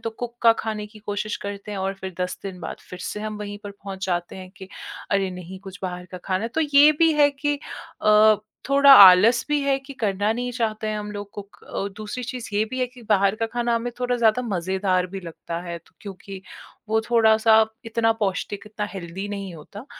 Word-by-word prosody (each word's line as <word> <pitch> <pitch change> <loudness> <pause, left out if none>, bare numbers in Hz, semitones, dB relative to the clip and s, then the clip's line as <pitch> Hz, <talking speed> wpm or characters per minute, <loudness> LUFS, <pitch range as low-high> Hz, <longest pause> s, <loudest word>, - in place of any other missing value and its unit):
तो 225 - -4
कुक 240 +1 -7
का 230 -1 +7
खाना - - -6
खाने 210 -1 -5
की 215 +1 -15
कोशिश 210 +1 -3
करते 200 +1 -6
हैं 205 - -4
और 190 +1 -2
फिर 190 -1 -8
10 180 0 -2
दिन 190 -2 -7
बाद - - -6
फिर 180 - -8
से 210 - -5
हम 215 0 -4
वहीं 205 -1 -6
पर 205 - -6
पहुँच 195 -1 -7
जाते 175 0 -2
हैं 185 -1 -10
कि, 190 0 -11 0.4
"अरे! 195 -1 +1
नहीं, 180 +1 -9
कुछ 190 -1 -10
बाहर 180 -1 -4
का 180 - -6
खाना 185 +1 -1
है।" 230 - -2
तो 320 - +1
ये 290 0 +6
भी 325 -1 +5
है 290 -1 +4
कि 290 +1 -2 0.4
अ, 215 0 +6 0.3
थोड़ा 280 0 +7
आलस 200 +5 +8
भी 295 0 +1
है 275 -1 +1
कि 270 +1 -11
करना 205 0 +1
नहीं 245 +2 -3
चाहते 220 -3 -2
हैं 215 0 -2
हम 210 0 -6
लोग 205 0 -7
कुक। 200 -1 -10
अ, 200 - -4
दूसरी 215 +4 -6
चीज़ 245 0 -6
ये 205 +1 +2
भी 255 - -4
है 255 - +1
कि 250 0 -16
बाहर 200 -1 +4
का 225 - -1
खाना 240 +1 -1
हमें 240 +1 -2
थोड़ा 250 0 0
ज़्यादा 230 +1 +3
मज़ेदार 190 -3 0
भी 195 +1 -7
लगता 170 -1 -7
है, 170 -1 -5
तो 165 - -28
क्योंकि 195 -1 -9 0.5
वो 220 +1 +2
थोड़ा-सा 220 -1 +5 0.2
इतना 225 0 +1
पौष्टिक, 195 +1 -3
इतना 210 -1 -4
हेल्दी 190 +2 -6
नहीं 200 -3 -5
होता। 200 - -11
210 Hz, 225 wpm, -23 LUFS, 190-230 Hz, 0.5 s, आलस